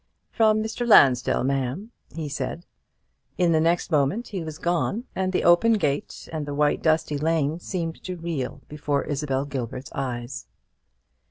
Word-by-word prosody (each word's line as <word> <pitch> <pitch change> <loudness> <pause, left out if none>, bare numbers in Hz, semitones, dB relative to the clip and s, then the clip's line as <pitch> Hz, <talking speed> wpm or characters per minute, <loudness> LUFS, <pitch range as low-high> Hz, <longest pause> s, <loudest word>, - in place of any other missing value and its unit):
"From 215 -2 +3
Mr. 225 +2 -3
Lansdell, 130 - +5
ma'am," 135 - -2 0.2
he 160 -2 -4
said. 165 +4 -4 0.7
In 175 -2 +3
the 160 -1 +3
next 170 +2 +1
moment 155 - +1
he 190 -5 -4
was 155 -1 -7
gone, 175 +7 -1
and 190 0 0
the 185 - 0
open 175 +7 +5
gate 145 -9 -2
and 155 -2 -3
the 145 - -4
white 150 0 +2
dusty 155 -2 +1
lane 160 0 0
seemed 170 -3 -4
to 185 - -4
reel 150 -5 -4
before 145 -1 -1
Isabel 140 -2 -2
Gilbert's 130 0 -5
eyes. 125 -1 -4
155 Hz, 155 wpm, -25 LUFS, 140-180 Hz, 0.7 s, Lansdell